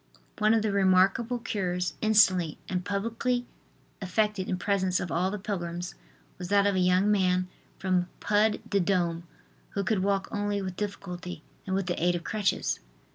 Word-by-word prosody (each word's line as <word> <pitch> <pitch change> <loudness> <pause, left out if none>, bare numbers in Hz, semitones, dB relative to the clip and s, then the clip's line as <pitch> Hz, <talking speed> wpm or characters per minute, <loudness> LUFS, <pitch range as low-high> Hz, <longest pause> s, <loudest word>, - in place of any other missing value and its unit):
One 215 +1 +4
of 220 - +2
the 215 - +1
remarkable 200 +5 +3
cures, 180 -6 -2
instantly 190 -7 +4
and 180 -1 -2
publicly 230 +5 -1 0.6
effected 195 +1 0
in 185 - 0
presence 190 -1 +1
of 175 - -4
all 180 +3 +1
the 210 - -3
pilgrims, 175 -3 -4 0.5
was 180 - -5
that 200 +1 +4
of 200 - +3
a 185 - +1
young 185 +3 +3
man 185 -2 +2 0.3
from 180 -2 0
Pud 210 +1 +2
de 200 - +1
Dome 170 -2 0 0.5
who 200 - 0
could 200 +1 +1
walk 195 0 0
only 205 -1 -1
with 190 -2 -4
difficulty 180 -5 -5 0.2
and 190 - 0
with 195 -1 0
the 175 -2 -2
aid 175 0 +3
of 170 - -4
crutches. 210 -1 0
190 Hz, 170 wpm, -28 LUFS, 180-205 Hz, 0.6 s, One